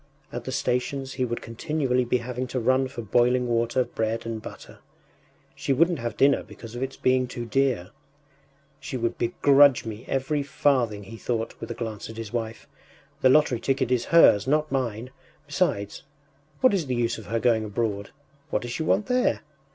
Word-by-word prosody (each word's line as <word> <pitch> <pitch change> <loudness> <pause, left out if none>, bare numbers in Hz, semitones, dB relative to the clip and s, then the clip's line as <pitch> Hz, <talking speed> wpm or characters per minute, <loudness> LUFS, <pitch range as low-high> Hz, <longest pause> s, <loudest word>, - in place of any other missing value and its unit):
At - - -5
the 130 - -4
stations 130 +2 -1
he 130 -1 -1
would 120 -1 -4
continually 125 +1 -1
be 125 +1 +2
having 125 +1 -4
to 125 +1 -2
run 130 +2 +2
for 130 -3 -7
boiling 125 +3 +2
water, 120 +2 +1
bread 115 -1 -3
and 115 -1 -4
butter.... - - -11 0.7
She 135 - -1
wouldn’t 165 +3 +2
have 120 0 -4
dinner 140 0 +4
because 115 -1 -11
of 120 - -6
its 135 0 -4
being 130 0 +2
too 120 -1 -6
dear.... 125 -7 0 0.9
“She 135 -1 -5
would 115 -1 -2
begrudge 140 +2 +4
me 110 +1 -7
every 135 +2 0
farthing,” 130 -7 +1
he 115 +4 -10
thought, 115 -1 -2
with - - -7
a - - -4
glance 110 -3 -5
at 110 - -9
his 115 -1 -7
wife. 115 -2 -4 0.5
“The 130 - +5
lottery 130 -3 +4
ticket 130 -1 0
is 125 -2 +1
hers, 150 -10 +6
not 150 +1 +1
mine! 125 -2 -2 0.3
Besides, 145 - -1 0.6
what 255 -4 +5
is 175 -7 0
the 125 - -1
use 115 -1 0
of 110 - -12
her 115 +2 -1
going 115 -2 +2
abroad? 105 -1 -2 0.4
What - - -1
does 120 - -5
she 160 - -3
want 180 +6 +2
there? 250 0 +1
125 Hz, 185 wpm, -25 LUFS, 115-135 Hz, 0.9 s, hers